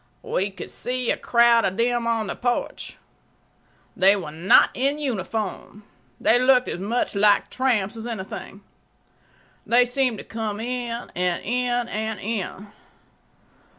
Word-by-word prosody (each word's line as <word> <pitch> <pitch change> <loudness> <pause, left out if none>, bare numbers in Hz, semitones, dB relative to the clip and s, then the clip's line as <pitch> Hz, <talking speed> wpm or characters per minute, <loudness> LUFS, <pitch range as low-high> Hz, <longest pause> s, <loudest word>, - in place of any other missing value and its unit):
We 195 +2 -1
could 190 -2 -9
see 250 -1 -2
a - - +1
crowd 235 -1 +4
of 190 0 -1
them 240 0 +1
on 225 -2 0
the - - -4
porch. 245 -1 -3 1.0
They 195 +2 +5
were 175 -7 -5
not 165 +5 +5
in 275 +3 0
uniform. 215 -5 -4 0.4
They 240 - +4
looked 255 0 +4
as - - -4
much 220 +6 -1
like 205 0 +3
tramps 230 -6 0
as 225 +1 -6
anything. 195 -2 -7 1.0
They 245 +1 +4
seemed 250 -2 0
to - - -8
come 220 -2 -4
in—and 235 -7 -3
in—and 240 -3 -1
in. 205 -2 -4
230 Hz, 130 wpm, -23 LUFS, 200-245 Hz, 1.0 s, They